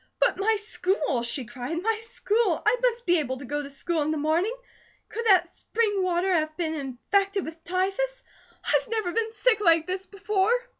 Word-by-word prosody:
"But - - +2
my 440 +3 +3
school!" 365 - 0
she 240 +2 0
cried. 250 +7 -4
"My 435 +4 0
school! 435 -4 0
I 430 +3 +5
must 485 -1 +1
be 350 -1 +4
able 260 -3 -2
to 265 - -9
go 290 +3 -2
to 280 - -8
school 315 +4 -2
in 295 - 0
the 310 - 0
morning. 330 +10 +1 0.5
Could 465 +1 -3
that 370 -4 +6
spring 415 +2 -1
water 365 +1 +1
have 310 -2 0
been 325 -3 -1
infected 380 - -1
with 320 +1 -9
typhus? 390 +8 -1 0.4
I've - - +2
never 440 -5 -1
been 450 +2 -1
sick 450 0 +2
like 330 -5 +4
this 370 +1 -4
before." 400 0 0
370 Hz, 190 wpm, -26 LUFS, 315-430 Hz, 0.5 s, that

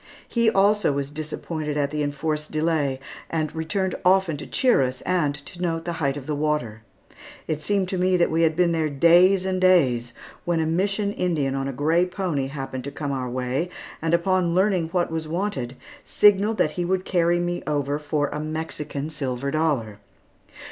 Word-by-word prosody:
He, 235 -2 +2
also, 205 -3 +3
was 140 0 -3
disappointed 155 0 -4
at 140 -1 0
the 150 0 -2
enforced 150 +1 -2
delay, 155 -4 0 0.3
and 155 -2 -2
returned 180 +4 -1
often 185 -3 +3
to - - -8
cheer 250 - +3
us, 130 0 -2
and 170 -6 0
to 175 - -9
note 165 -2 -1
the 170 - -2
height 140 -1 0
of 140 - -8
the 150 - -2
water. 145 -7 -1 0.7
It 155 -1 -2
seemed 195 +3 0
to 185 - -2
me 185 0 +3
that 170 - +2
we 165 +1 +1
had 160 -1 +3
been 175 0 +3
there 160 -2 0
days 175 +6 +5
and 185 -1 -1
days, 130 -11 +3 0.3
when 175 -2 0
a 160 - +1
Mission 195 +5 0
Indian 155 -9 0
on 135 0 -2
a - - -2
gray 160 +7 +2
pony 175 -8 -2
happened 135 -2 -5
to 140 - -5
come 145 -1 -4
our 130 -2 -3
way, 130 +7 -2 0.3
and 165 +1 +2
upon 175 0 +1
learning 185 -3 +2
what 175 0 -1
was 160 -1 -3
wanted, 160 -8 -3 0.3
signalled 210 +2 +4
that 155 - +2
he 175 - -3
would 185 +1 -1
carry 175 -1 +2
me 175 0 -2
over 145 -1 -1
for 145 0 -1
a 150 - -4
Mexican 155 -2 -4
silver 140 -3 -3
dollar. 140 -10 -1
160 Hz, 190 wpm, -24 LUFS, 145-180 Hz, 0.7 s, days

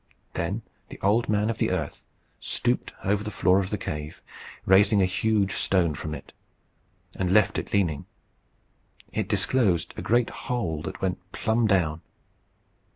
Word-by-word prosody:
Then 100 +7 -2 0.3
the - - -10
Old 105 +4 +2
Man 105 +1 +2
of 115 - -7
the - - +2
Earth - - -3 0.4
stooped - - -1
over 100 +1 +1
the 105 - -4
floor 95 -2 +3
of 95 -1 -2
the 105 - -1
cave, 75 -5 -5 0.5
raised 95 +2 +6
a 100 -2 +5
huge 100 +1 +1
stone 90 -5 +2
from 75 +2 -5
it, 70 - -11 0.8
and 90 -1 -1
left 105 +2 +4
it - - -7
leaning. 85 -8 0 1.1
It 110 -2 -1
disclosed 100 -4 +2
a - - -3
great 120 +1 +2 0.2
hole 90 -12 -1
that 95 +2 -6
went 95 -1 0
plumb 110 +1 +1
down. 85 -6 +1
95 Hz, 155 wpm, -26 LUFS, 90-105 Hz, 1.1 s, raised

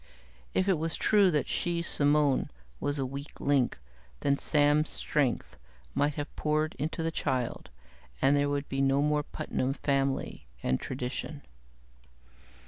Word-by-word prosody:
If 185 - +2
it 185 -5 +3
was 165 +1 -1
true 205 -3 +4
that 150 -5 +1
she, 170 -1 -1
Simone, 145 -3 +2 0.3
was 145 0 0
a 135 - 0
weak 140 +3 -7
link, 140 -3 +2 0.4
then 140 - +3
Sam's 150 +1 +2
strength 140 -5 -1 0.4
might 145 0 +1
have 145 +1 -5
poured 155 +1 0
into 160 +2 -2
the 165 - 0
child, 130 -6 -2 0.5
and 135 +2 +4
there 145 0 +2
would 145 0 -1
be 135 0 -1
no 135 +1 +3
more 150 0 +2
Putnam 135 -2 -2
family 135 - -1 0.2
and 65 - +1
tradition. 135 +3 -5
145 Hz, 140 wpm, -30 LUFS, 135-155 Hz, 0.5 s, true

